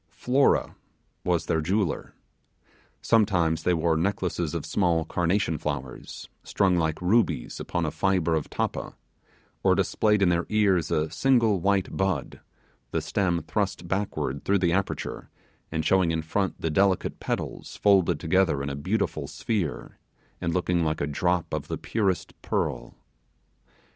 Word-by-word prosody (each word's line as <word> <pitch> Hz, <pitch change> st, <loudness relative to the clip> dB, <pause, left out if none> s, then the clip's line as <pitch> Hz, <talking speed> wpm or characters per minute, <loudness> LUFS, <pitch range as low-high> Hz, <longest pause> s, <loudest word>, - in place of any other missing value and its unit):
Flora 135 Hz, +3 st, +2 dB, 0.5 s
was 90 Hz, -2 st, +1 dB
their 80 Hz, -, +1 dB
jeweller. 95 Hz, +3 st, -1 dB, 0.9 s
Sometimes 90 Hz, -8 st, +2 dB
they 90 Hz, -, +2 dB
wore 80 Hz, 0 st, +1 dB
necklaces 90 Hz, -2 st, -1 dB
of 80 Hz, -, -3 dB
small 85 Hz, -1 st, +1 dB
carnation 85 Hz, 0 st, 0 dB
flowers, 70 Hz, -4 st, -5 dB, 0.2 s
strung 95 Hz, -2 st, +2 dB
like 80 Hz, -2 st, 0 dB
rubies 90 Hz, -, +1 dB
upon -, -, -2 dB
a -, -, -1 dB
fibre 90 Hz, -4 st, +1 dB
of 80 Hz, -2 st, -1 dB
tappa, -, -, -3 dB, 0.7 s
or -, -, +4 dB
displayed 105 Hz, -2 st, +2 dB
in 90 Hz, -, +4 dB
their 85 Hz, 0 st, +1 dB
ears 100 Hz, -6 st, +2 dB
a 75 Hz, 0 st, 0 dB
single 115 Hz, +1 st, +3 dB
white 100 Hz, +1 st, +1 dB
bud, 95 Hz, -2 st, -1 dB, 0.5 s
the -, -, -1 dB
stem 85 Hz, -4 st, 0 dB
thrust 95 Hz, -1 st, -2 dB
backward 95 Hz, -7 st, -2 dB
through 100 Hz, -, +2 dB
the 90 Hz, -3 st, +1 dB
aperture, 100 Hz, +1 st, -2 dB, 0.4 s
and 80 Hz, -1 st, -2 dB
showing 95 Hz, -3 st, +3 dB
in 80 Hz, -1 st, -1 dB
front 95 Hz, +4 st, -1 dB
the 80 Hz, -, -1 dB
delicate 95 Hz, +2 st, +1 dB
petals -, -, -4 dB
folded 100 Hz, -4 st, +3 dB
together 85 Hz, -4 st, +2 dB
in 70 Hz, -, -3 dB
a -, -, -4 dB
beautiful 95 Hz, +10 st, -1 dB
sphere, 100 Hz, -10 st, -3 dB, 0.4 s
and 85 Hz, -2 st, 0 dB
looking 90 Hz, -1 st, +1 dB
like 80 Hz, 0 st, -1 dB
a -, -, 0 dB
drop 90 Hz, +4 st, -1 dB
of -, -, -3 dB
the -, -, -3 dB
purest 100 Hz, -6 st, -1 dB
pearl. -, -, -2 dB
90 Hz, 145 wpm, -26 LUFS, 80-100 Hz, 0.9 s, or